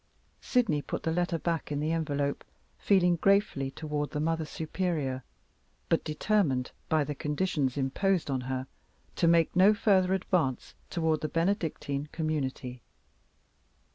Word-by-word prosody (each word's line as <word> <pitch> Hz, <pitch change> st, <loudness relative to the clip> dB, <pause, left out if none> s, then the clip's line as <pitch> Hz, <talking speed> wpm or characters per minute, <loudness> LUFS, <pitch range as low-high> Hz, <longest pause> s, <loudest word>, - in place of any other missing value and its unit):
Sydney 225 Hz, -, +1 dB
put -, -, -5 dB
the 160 Hz, -, 0 dB
letter 175 Hz, 0 st, 0 dB
back 165 Hz, -2 st, -2 dB
in 145 Hz, -, -1 dB
the 155 Hz, +2 st, 0 dB
envelope, 145 Hz, -3 st, -1 dB, 0.4 s
feeling 180 Hz, -3 st, +3 dB
gratefully 195 Hz, -8 st, +2 dB
toward 150 Hz, +1 st, -3 dB
the 150 Hz, -, -4 dB
Mother 165 Hz, +1 st, 0 dB
Superior, 155 Hz, -5 st, -2 dB, 0.7 s
but 165 Hz, -, +2 dB
determined 155 Hz, -5 st, +1 dB, 0.2 s
by 155 Hz, -2 st, +3 dB
the 145 Hz, +1 st, -3 dB
conditions 150 Hz, -2 st, -1 dB
imposed 160 Hz, +5 st, 0 dB
on 130 Hz, -1 st, 0 dB
her 130 Hz, 0 st, -3 dB, 0.5 s
to 170 Hz, -, +3 dB
make 165 Hz, -1 st, +4 dB
no 195 Hz, +4 st, +6 dB
further 190 Hz, -3 st, +3 dB
advance 170 Hz, -8 st, -1 dB, 0.2 s
toward 160 Hz, -2 st, 0 dB
the 155 Hz, -, -2 dB
Benedictine 165 Hz, -5 st, -1 dB
community. 135 Hz, -6 st, -3 dB
160 Hz, 135 wpm, -29 LUFS, 140-180 Hz, 0.7 s, no